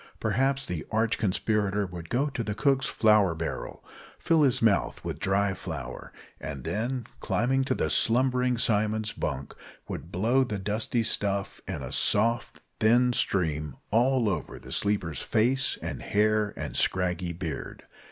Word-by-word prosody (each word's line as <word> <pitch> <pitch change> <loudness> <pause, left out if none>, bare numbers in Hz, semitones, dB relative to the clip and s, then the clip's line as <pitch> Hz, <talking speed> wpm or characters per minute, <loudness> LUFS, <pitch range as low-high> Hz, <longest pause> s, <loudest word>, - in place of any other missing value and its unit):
Perhaps 135 +1 +1
the 85 -3 -4
arch 110 +1 +1
conspirator 105 0 0
would 90 -3 -8
go 125 +4 +1
to 125 -5 -3
the 105 -2 -3
cook's 135 +1 +2
flour 105 -6 +4
barrel, 80 -7 -5 0.3
fill 165 -1 +2
his 135 -5 +4
mouth 105 -5 +1
with - - -4
dry 100 0 +1
flour, - - -7 0.3
and 70 -2 -6
then, 120 - -2
climbing 135 +4 +1
to - - 0
the - - 0
slumbering 125 +1 +2
Simon's 110 -1 +1
bunk, 70 -2 -4 0.3
would 85 - -6
blow 115 +9 +2
the 120 -5 -3
dusty 110 +4 -1
stuff 100 -2 -1
in - - -4
a - - -6
soft, 115 +3 +1 0.2
thin 120 +3 +4
stream 75 - 0 0.2
all 120 +2 +3
over 90 -7 -2
the - - -12
sleeper's 95 -9 0
face 125 +5 +1
and - - -4
hair 105 0 +2
and - - -5
scraggy 90 -1 0
beard. 85 -4 -6
105 Hz, 150 wpm, -27 LUFS, 95-120 Hz, 0.3 s, flour